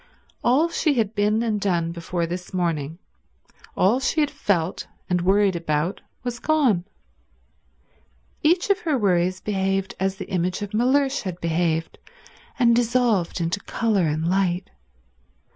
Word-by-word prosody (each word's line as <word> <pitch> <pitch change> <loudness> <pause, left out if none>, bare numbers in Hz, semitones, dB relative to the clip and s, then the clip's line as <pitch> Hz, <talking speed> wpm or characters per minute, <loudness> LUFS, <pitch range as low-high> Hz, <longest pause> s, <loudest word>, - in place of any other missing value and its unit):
All 270 +7 +4
she 315 -3 +1
had 220 -3 0
been 210 +2 +1
and 215 -3 -1
done 170 -4 0
before 170 0 -3
this 180 +2 -6
morning, 165 -3 -1 0.8
all 215 +7 +3
she 270 +4 0
had 295 -2 +2
felt 180 -3 -1 0.2
and 180 -2 +1
worried 195 +1 +3
about, 165 +1 -1 0.2
was 245 -1 -4
gone. 260 - +2 1.6
Each 345 +5 +3
of 400 - +2
her 315 -8 0
worries 185 -3 +1
behaved 195 -1 -1
as 190 +1 0
the - - -7
image 185 +2 -1
of 205 - -7
Mellersh 270 +4 +2
had 180 -3 -5
behaved, 165 -1 -1 0.6
and 235 -2 +4
dissolved 235 -7 +1
into 170 +4 -1
colour 200 -4 0
and 155 +2 -1
light. 185 0 0
195 Hz, 140 wpm, -23 LUFS, 175-235 Hz, 1.6 s, All